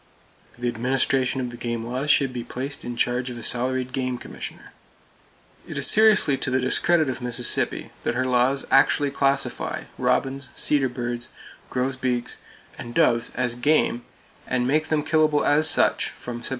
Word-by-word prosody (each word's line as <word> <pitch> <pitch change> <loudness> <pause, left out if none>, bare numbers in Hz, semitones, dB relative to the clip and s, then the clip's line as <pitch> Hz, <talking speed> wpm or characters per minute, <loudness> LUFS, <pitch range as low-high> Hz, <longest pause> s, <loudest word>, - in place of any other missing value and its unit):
The 120 0 -3
administration 130 +2 0
of 125 -1 -4
the 120 - -9
game 120 -1 -3
laws 130 +5 -3
should 140 -3 +3
be 120 -1 -4
placed 135 +4 -5
in 120 - -5
charge 125 +1 0
of 120 - -7
a 120 - -8
salaried 130 +1 -1
game 130 -1 -2
commissioner. - - -9 0.9
It - - -6
is - - +4
seriously 215 -10 +5
to - - -2
the 130 0 +1
discredit 155 +5 +2
of 130 -1 -4
Mississippi 120 0 +1
that - - -2
her 130 +1 0
laws 130 +2 +2
actually 140 +1 +4
classify 140 0 -1 0.2
robins, 135 0 0
cedar 140 -3 +2
birds, 120 -1 -5 0.4
grosbeaks 125 -1 -2 0.4
and 120 0 -8
doves 120 -8 +2
as 125 -1 0
"game," 125 -1 +1 0.5
and 125 -1 0
make 155 +4 +1
them 155 -2 0
killable 155 -2 +2
as 155 +2 +3
such - - +2
from 120 -1 -8
Sept. - - -2
130 Hz, 165 wpm, -24 LUFS, 120-140 Hz, 0.9 s, seriously